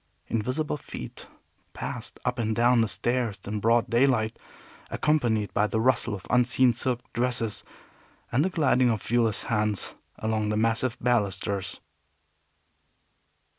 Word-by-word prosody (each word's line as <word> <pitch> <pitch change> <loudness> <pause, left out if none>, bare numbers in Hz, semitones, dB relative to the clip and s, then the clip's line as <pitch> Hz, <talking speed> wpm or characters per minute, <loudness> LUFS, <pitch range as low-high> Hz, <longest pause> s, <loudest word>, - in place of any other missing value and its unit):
Invisible 130 +8 -1
feet - - -9 0.5
passed - - -6
up 125 0 -1
and 110 -1 0
down 120 +1 +4
the 115 - +2
stairs 120 -2 -1
in 105 +1 -3
broad 115 +2 +3
daylight, 120 -2 +2 0.5
accompanied 120 -9 +1
by 105 - +2
the 110 - -1
rustle 120 -3 +2
of 95 - -10
unseen 125 0 +4
silk 125 +1 -1
dresses, 120 -3 0 0.7
and 130 +5 +3
the 185 - +1
gliding 130 -7 +3
of 110 -4 -1
viewless 115 -3 +1
hands 105 -3 0 0.2
along 110 -1 -1
the 105 - 0
massive 115 +2 +1
balusters. 100 -4 -1
115 Hz, 130 wpm, -27 LUFS, 110-125 Hz, 0.7 s, down